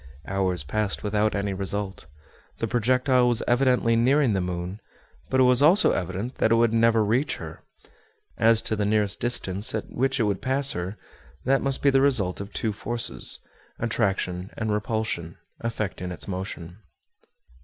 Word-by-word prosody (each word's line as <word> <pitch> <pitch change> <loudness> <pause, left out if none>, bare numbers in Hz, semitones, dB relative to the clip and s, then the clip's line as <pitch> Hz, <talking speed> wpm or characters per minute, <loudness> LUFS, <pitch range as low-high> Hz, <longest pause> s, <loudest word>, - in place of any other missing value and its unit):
Hours 95 -4 -1
passed 105 +7 -2
without 105 +1 0
any 100 0 -2
result. 100 -2 -4 0.5
The - - -2
projectile 125 +2 +2
was 120 -1 +1
evidently 125 -2 +2
nearing 130 +1 +3
the 95 - 0
moon, 90 +3 -5 0.5
but 130 - +1
it - - +6
was 125 +1 +4
also 170 +8 +6
evident 95 +8 -4
that 110 - +2
it - - +5
would 115 -1 +2
never 115 -1 +3
reach 125 +8 0
her. - - -9 0.7
As 115 0 +3
to 110 - -1
the 105 - -1
nearest 105 -1 +1
distance 105 -4 0
at - - -5
which 135 +2 0
it - - +3
would 100 -2 -1
pass 135 +1 +3
her, 90 +4 -4 0.5
that 135 +2 +2
must 135 -1 -1
be 140 - +5
the 135 0 +3
result 110 -10 +1
of 100 +1 -8
two 110 0 -2
forces, 120 +3 +1 0.4
attraction 90 -1 -2
and 110 -1 -2
repulsion, 105 -5 -3 0.3
affecting 105 -5 -4
its 90 - -7
motion. 90 -1 -6
110 Hz, 165 wpm, -25 LUFS, 95-125 Hz, 0.7 s, it